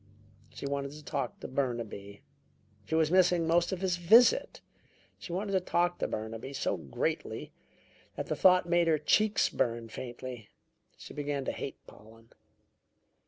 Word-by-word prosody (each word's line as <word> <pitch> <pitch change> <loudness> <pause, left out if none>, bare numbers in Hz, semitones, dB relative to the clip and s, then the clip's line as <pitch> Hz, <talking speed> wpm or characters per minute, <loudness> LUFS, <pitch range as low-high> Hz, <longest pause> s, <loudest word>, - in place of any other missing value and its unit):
She - - -8
wanted 140 0 -3
to 150 0 -11
talk 140 -5 -3
to - - -5
Burnaby. 115 -7 -4 0.6
She 160 - -2
was 160 -1 +2
missing 180 -2 +4
most 170 +1 +2
of 190 -1 -3
his 185 -2 0
visit. 240 - +5 0.6
She - - -8
wanted 195 +3 -2
to 190 - +3
talk 175 -1 0
to - - 0
Burnaby 110 +5 -5
so 120 - -1
greatly 70 -8 -3 0.6
that - - -3
the - - -2
thought 185 -1 +5
made 170 0 +3
her 160 -2 +4
cheeks 210 +8 +3
burn 115 -1 -1
faintly. 120 -2 -8 0.5
She - - -11
began 145 -2 -3
to - - -1
hate 135 - -7
Pollen. 115 +2 -17
145 Hz, 155 wpm, -30 LUFS, 120-175 Hz, 0.6 s, visit